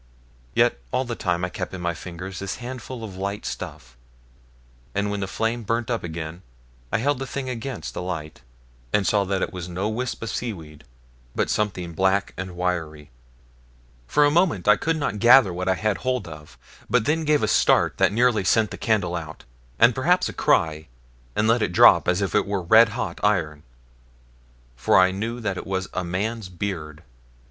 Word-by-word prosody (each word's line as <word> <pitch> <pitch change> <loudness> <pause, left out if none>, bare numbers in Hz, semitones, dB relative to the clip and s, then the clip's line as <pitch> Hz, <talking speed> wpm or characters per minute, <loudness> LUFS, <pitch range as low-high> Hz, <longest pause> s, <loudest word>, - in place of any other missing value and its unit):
Yet - - +3
all 130 - 0
the 120 - -4
time 90 -5 -1
I - - -4
kept 95 - -5
in 90 - -7
my 85 0 -1
fingers 90 +3 -8
this 100 0 -4
handful 125 -1 -7
of 100 -4 -8
light 100 +2 -4
stuff; - - -7 1.0
and 100 0 0
when 105 - -2
the 95 - -2
flame 115 +5 -1
burnt 115 +2 -2
up 115 - -1
again 80 0 -6 0.5
I - - +2
held 140 +3 0
the 135 - -4
thing 130 0 -4
against 125 +1 -5
the - - -4
light, 80 -4 -5 0.5
and 105 -2 +2
saw 100 0 +2
that 95 0 -1
it 105 - -3
was 90 -1 -6
no 95 +4 -2
wisp 120 +2 -3
of 115 - -3
seaweed, 80 -10 -6 0.5
but - - 0
something 90 -5 -2
black 95 +3 +1
and 95 -1 -6
wiry. 80 -5 -3 1.0
For 150 0 +4
a 145 - +3
moment, 160 - +2
I 105 - +7
could 165 0 -1
not 115 -9 -2
gather 120 -4 +7
what 90 +2 -2
I 95 - +3
had 105 +1 0
hold 130 -4 -1
of, 75 -2 -11 0.3
but 125 -3 +2
then 160 +4 +1
gave 150 -1 +2
a - - +2
start - - +3
that - - +4
nearly 115 -1 +2
sent 110 +3 +2
the - - -7
candle 100 -6 +1
out, 80 -3 -7 0.3
and 120 +1 +6
perhaps 175 +9 +2
a - - -6
cry, 80 -1 +1 0.5
and 110 - +2
let 115 +1 +3
it 100 -4 0
drop - - +6
as 90 +2 +2
if 95 - -2
it - - +2
were 100 -2 -2
red 110 +6 +6
hot 125 - -3
iron, 80 -8 +1 1.1
for 60 - +3
I 95 0 +5
knew 115 +5 -4
that 100 -4 -2
it - - -6
was 95 0 -2
a 90 - -2
man's 100 +4 -3
beard. 85 -4 -5
100 Hz, 195 wpm, -24 LUFS, 90-115 Hz, 1.1 s, I